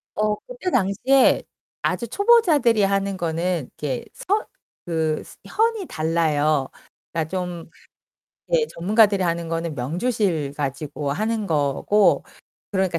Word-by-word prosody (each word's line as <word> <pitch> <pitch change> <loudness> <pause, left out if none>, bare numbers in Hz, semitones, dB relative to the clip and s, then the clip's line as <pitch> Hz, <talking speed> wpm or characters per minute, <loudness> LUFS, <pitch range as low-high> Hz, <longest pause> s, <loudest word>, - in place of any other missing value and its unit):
어 210 0 +1
그때 - - -4
당시에 255 - +3 0.4
아주 235 - -1
초보자들이 310 - +4
하는 195 0 0
거는 170 -2 -1
이렇게 135 -5 -3
선 410 +3 0 0.4
그 160 -2 -1
스 - - -15
현이 445 -4 0
달라요. 155 -3 +1 0.5
그러니까 160 -1 -1
좀 180 -3 -4 0.8
예 485 -2 +4
전문가들이 200 +2 +3
하는 170 -1 -1
거는 165 -1 -2
명주실 160 - -1
가지고 145 0 -3
하는 215 +6 -1
거고 155 +7 +2 0.5
그러니까 190 -4 0
180 Hz, 265 characters per minute, -23 LUFS, 160-220 Hz, 0.8 s, 초보자들이